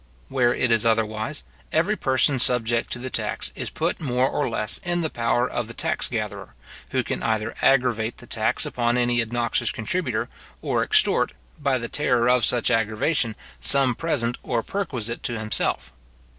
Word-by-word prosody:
Where 125 -3 +2
it 125 0 0
is 115 -1 +4
otherwise, 110 - 0 0.3
every 170 +7 +2
person 130 - +2
subject 120 -1 +2
to - - -2
the 130 +1 -6
tax - - -1
is - - -4
put - - -2
more 130 -3 +1
or 145 0 -1
less 105 -2 0
in 175 -2 -2
the 160 - -2
power 120 +1 +1
of 120 -3 -3
the 115 - -8
tax - - +2
gatherer, 105 - -5 0.3
who - - 0
can - - -4
either 110 -1 -1
aggravate 120 -4 +2
the - - -12
tax - - 0
upon 120 0 0
any 120 0 +2
obnoxious 120 +1 -1
contributor, 175 +12 -2 0.4
or - - 0
extort, 430 0 +3 0.3
by 140 -3 +1
the 115 -1 -4
terror 120 -3 +1
of 125 -1 +3
such 120 +2 +4
aggravation, 115 +2 +1 0.2
some 135 -3 +3
present 125 -5 -2
or 115 -2 -1
perquisite 125 - -3
to 120 -3 -3
himself. 110 - -1
120 Hz, 170 wpm, -24 LUFS, 115-130 Hz, 0.4 s, is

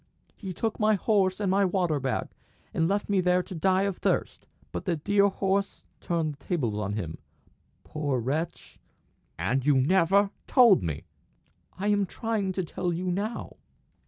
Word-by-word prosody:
"He 190 -3 -6
took 220 +5 -3
my 215 0 +4
horse 195 -2 +1
and 200 -3 0
my 200 +1 +3
water 180 -5 +1
bag, 130 -1 -2 0.4
and 165 - +1
left 200 +2 0
me 200 -2 +2
there 180 0 +2
to 185 - -9
die 190 +3 +2
of 200 -2 -1
thirst; - - -1 0.2
but - - -5
the 180 -3 +1
dear 200 +6 +3
horse 195 0 -1 0.2
turned 165 -4 -1
the 140 - -20
tables 135 - -1
on 100 -1 -2
him 90 -7 -4 0.6
poor 145 -4 -2
wretch!" 150 +8 -4 0.6
"And 115 +10 0
you 145 0 +4
never 190 +7 +3 0.2
told 235 -7 +6
me!" 75 -3 -3 0.7
"I 200 +3 -1
am 205 -2 +2
trying 215 -2 -2
to 185 - -1
tell 175 +1 -3
you 180 +2 -2
now." 210 +6 -4
185 Hz, 165 wpm, -27 LUFS, 150-200 Hz, 0.7 s, told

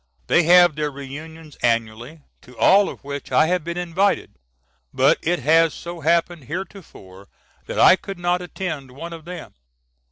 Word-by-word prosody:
They - - +3
have 175 -1 +6
their 150 0 -2
reunions 150 +3 -10
annually, 115 +5 -2 0.2
to 125 -1 -17
all 200 +1 +4
of - - -11
which 140 0 -7
I - - +4
have 180 0 0
been 170 +2 -5
invited, 180 +3 0 0.6
but - - +3
it 175 +2 0
has 160 +3 +3
so 170 0 -8
happened 170 -1 0
heretofore 145 - -9 0.4
that - - -5
I - - +7
could 195 -1 -8
not 175 +1 0
attend 175 -6 -6
one 165 +7 -9
of 160 -1 -11
them. 175 -1 -9
165 Hz, 160 wpm, -21 LUFS, 140-175 Hz, 0.6 s, I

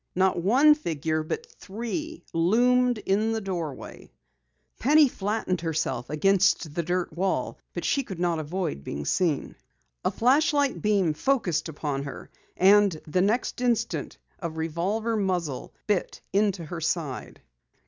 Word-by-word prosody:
Not 185 -1 +2
one 265 - +6
figure 160 - -2
but 440 - -4
three 240 - -5
loomed 245 +8 +3
in 215 +2 0
the 225 - -1
doorway! 175 -9 -6 0.7
Penny 300 +3 +6
flattened 205 -5 -2
herself 160 -7 -2
against 180 -1 +2
the 170 - 0
dirt 175 0 -2
wall. 190 +2 -1 0.2
But - - -3
she 280 - +2
could 195 -9 -8
not 175 -2 +1
avoid 155 - -3
being 70 0 -5
seen. 165 - 0 0.5
A - - +2
flashlight 285 +3 +2
beam 200 -6 +2
focused 175 - 0
upon 145 -2 -3
her, 140 - -8 0.3
and 195 -3 +5
the 170 +4 +1
next 220 +5 0
instant 235 -2 -1 0.2
a 170 - -3
revolver 170 +8 -2
muzzle 180 -9 -2
bit 205 -4 -1
into 200 -4 +1
her 165 +1 -6
side. 155 -5 -3
190 Hz, 135 wpm, -26 LUFS, 160-225 Hz, 0.7 s, one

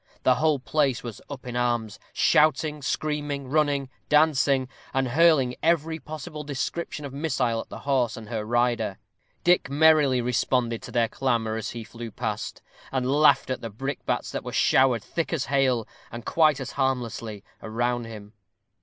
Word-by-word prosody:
The 130 - +5
whole 150 +3 +2
place 135 -1 0
was 115 -4 -7
up 140 -2 -8
in 125 -1 -6
arms, 120 -3 -1
shouting, 155 0 +3
screaming, 145 -1 -2
running, 145 -1 +1 0.2
dancing, 140 -3 +3 0.3
and 135 -1 +1
hurling 145 -3 +4
every 160 0 +1
possible 155 +1 -7
description 150 +2 -4
of 135 - -7
missile 135 -6 0
at - - -13
the - - -7
horse 130 -4 0
and 110 -2 -9
her 110 -1 -3
rider. 120 -3 0 0.5
Dick 175 -5 +3
merrily 145 -3 +4
responded 120 -1 0
to - - -9
their 120 -2 +2
clamor 115 -3 -1
as 110 - -3
he 115 -1 -6
flew 115 +1 -8
past, - - -4 0.3
and 130 -1 0
laughed 150 -2 +4
at 130 - -3
the 115 - -5
brickbats 135 +7 -3
that - - -4
were - - -6
showered 125 -5 +3
thick 165 - -3
as 160 -6 -1
hail, 130 -4 +1 0.2
and 120 0 -8
quite 155 -4 +3
as 130 -2 -5
harmlessly, 115 -6 -2 0.2
around 120 +2 -1
him. 105 -2 -10
130 Hz, 165 wpm, -26 LUFS, 120-150 Hz, 0.5 s, The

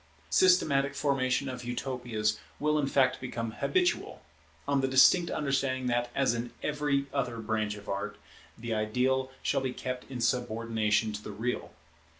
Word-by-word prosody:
Systematic 140 - +4
formation 140 -2 +1
of 125 -1 -5
Utopias 120 -4 -2 0.2
will 150 0 +2
in 140 - +1
fact 130 -2 +2
become 115 -3 -4
habitual; 360 - 0 0.4
on 140 -1 +2
the 135 - +1
distinct 135 +7 +6
understanding 135 -3 0
that, 120 0 0
as 135 -4 +2
in 120 +1 -4
every 145 -2 0
other 125 -4 -1
branch 110 -2 -1
of 105 -1 -12
art, 100 0 -3 0.4
the 115 0 -4
ideal 125 +5 +1
shall - - +1
be 130 -1 -2
kept 125 -1 -5
in 130 -2 -5
subordination 115 -2 0
to 105 - -5
the - - -7
real. 105 -5 -3
125 Hz, 155 wpm, -30 LUFS, 115-135 Hz, 0.4 s, distinct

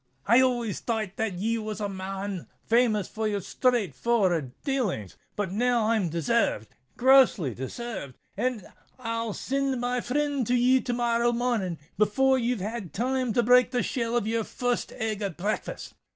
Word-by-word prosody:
"I 235 +5 +6
always 240 -5 0
thought 220 -4 -3
that 220 -3 -1
ye 225 +5 -1
was 215 -1 -5
a 205 - -1
man 195 -1 -5 0.2
famous 225 -4 +2
for 220 0 -3
your 205 -1 -1
straight 225 - +1
for'ard 180 - +1
dalings; 225 - -1 0.2
but 205 -3 -2
I'm 225 -2 +1
desayved—grossly 170 - +2
desayved;—and 215 - -5 0.3
I'll 230 -3 -3
sind 270 +1 -1
my 245 0 -1
frind 285 -1 -1
to 250 - +2
ye 250 +1 +4
to 245 - -2
morrow 240 0 +2
mornin', 230 -8 -1 0.2
before 265 +6 +3
you've 240 -3 -1
had 205 -5 -5
time 255 +4 0
to 240 - +3
break 250 +1 +5
the 245 -1 0
shell 235 -1 -1
of 235 - 0
your 225 +1 0
first 245 +2 -2
egg 220 -3 -3
at 195 -5 -3
breakfast." 205 +4 -3
230 Hz, 150 wpm, -27 LUFS, 200-245 Hz, 0.3 s, I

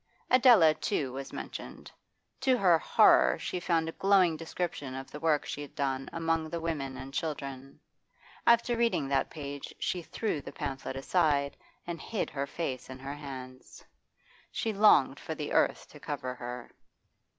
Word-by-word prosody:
Adela, 235 - +7
too, 135 -3 -2
was 135 +1 -6
mentioned; - - -8 0.5
to 260 -2 +3
her 180 -6 +5
horror 65 - +5
she 180 - -3
found 165 -2 +1
a - - -2
glowing 190 -3 +3
description 160 -4 -4
of 135 0 -7
the 150 - -7
work 155 -2 +2
she 145 - -5
had 145 - -9
done 135 -2 -2
among 165 -1 -1
the 170 - -3
women 145 -5 -3
and 135 +1 -8
children. 140 -4 -5 0.7
After 235 +1 +5
reading 230 -11 +1
that 135 -1 +1
page 145 -2 -7
she 180 - -2
threw 170 -2 -3
the - - -8
pamphlet 135 -4 -5
aside 140 -1 +1 0.3
and 170 -2 -5
hid 220 - -3
her 140 0 -3
face 135 -4 -4
in 130 - -7
her 135 +2 -6
hands. 130 -3 -9 0.7
She 225 - -2
longed 175 -10 +5
for 160 - -5
the 150 -1 -4
earth - - +2
to - - -13
cover 125 0 -4
her. 125 -1 -7
150 Hz, 160 wpm, -30 LUFS, 135-170 Hz, 0.7 s, Adela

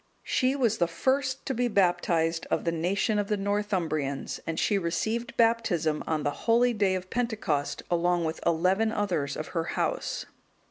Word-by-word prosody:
She 260 +1 +1
was 235 -5 +1
the 170 - +3
first 260 +9 0
to 270 - -1
be 245 0 +1
baptized 175 -5 +1
of - - 0
the 170 - +1
nation 190 +6 0
of 205 - -1
the 210 - 0
Northumbrians, 185 -9 -1
and 165 -1 -2
she 205 -2 +2
received 220 +7 -2
Baptism 225 -10 +2
on 155 -2 0
the 145 +9 -4
holy 240 +1 +5
day 200 -3 +2
of 185 0 -6
Pentecost, 220 - -1
along 175 0 +2
with 160 0 -3
eleven 185 +6 +2
others 175 -10 -1
of 155 - -5
her 165 -2 -2
house. - - -1
185 Hz, 170 wpm, -28 LUFS, 165-225 Hz, -, holy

